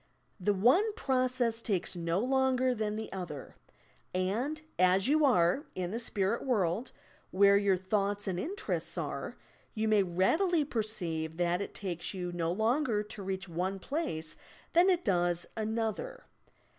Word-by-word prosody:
The 200 Hz, +2 st, +1 dB
one 345 Hz, -, +4 dB
process 255 Hz, -, +1 dB
takes 195 Hz, -6 st, -1 dB
no 170 Hz, 0 st, -1 dB
longer 260 Hz, 0 st, +2 dB
than 215 Hz, -2 st, -2 dB
the 220 Hz, -1 st, -5 dB
other, 175 Hz, -7 st, -6 dB, 0.6 s
and, 225 Hz, +12 st, -1 dB, 0.2 s
as 185 Hz, +3 st, +4 dB
you 305 Hz, +2 st, +4 dB
are 215 Hz, -, +3 dB
{in 180 Hz, -1 st, -3 dB
the 230 Hz, -, -2 dB
spirit 210 Hz, -1 st, 0 dB
world) 215 Hz, -3 st, 0 dB, 0.4 s
where 200 Hz, +1 st, +5 dB
your 200 Hz, -2 st, +3 dB
thoughts 200 Hz, +2 st, -1 dB
and 180 Hz, -2 st, -1 dB
interests 385 Hz, -, -3 dB
are, -, -, -4 dB, 0.4 s
you 220 Hz, 0 st, 0 dB
may 215 Hz, -2 st, +4 dB
readily 295 Hz, -, +2 dB
perceive 175 Hz, -, -3 dB
that 175 Hz, +1 st, +1 dB
it -, -, -6 dB
takes 180 Hz, -1 st, -4 dB
you 180 Hz, -1 st, -3 dB
no 170 Hz, -1 st, -1 dB
longer 220 Hz, -, +1 dB
to 210 Hz, 0 st, -9 dB
reach 190 Hz, 0 st, -4 dB
one 180 Hz, +3 st, -2 dB
place 195 Hz, -, -3 dB, 0.4 s
than 350 Hz, +3 st, +6 dB
it 360 Hz, -2 st, +2 dB
does 175 Hz, -3 st, +2 dB
another. 225 Hz, -, -3 dB
205 Hz, 145 wpm, -31 LUFS, 180-255 Hz, 0.6 s, than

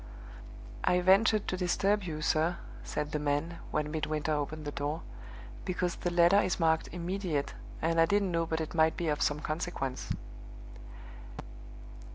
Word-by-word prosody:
"I 180 Hz, -, +3 dB
ventured 200 Hz, +3 st, +4 dB
to 185 Hz, -, -1 dB
disturb 195 Hz, +3 st, +2 dB
you, 155 Hz, -3 st, -4 dB
sir," 160 Hz, +3 st, +2 dB, 0.3 s
said 150 Hz, 0 st, -3 dB
the 150 Hz, -, -1 dB
man, 150 Hz, +3 st, -1 dB
when 150 Hz, 0 st, -1 dB
Midwinter 155 Hz, 0 st, -1 dB
opened 150 Hz, +1 st, -3 dB
the 145 Hz, -, -3 dB
door, 145 Hz, +3 st, -3 dB, 0.6 s
"because 180 Hz, -1 st, -1 dB
the 175 Hz, -, -1 dB
letter 175 Hz, +3 st, +5 dB
is 185 Hz, -, -1 dB
marked 160 Hz, -1 st, +2 dB
'Immediate,' 175 Hz, -4 st, -2 dB, 0.3 s
and 165 Hz, 0 st, +3 dB
I 165 Hz, -, +5 dB
didn't 200 Hz, -1 st, +2 dB
know 165 Hz, -1 st, 0 dB
but 160 Hz, 0 st, -1 dB
it 155 Hz, -, -4 dB
might 160 Hz, -1 st, +3 dB
be 170 Hz, -2 st, -1 dB
of 150 Hz, -, 0 dB
some 145 Hz, +1 st, +1 dB
consequence." 155 Hz, -5 st, -3 dB
165 Hz, 155 wpm, -31 LUFS, 150-180 Hz, 0.6 s, letter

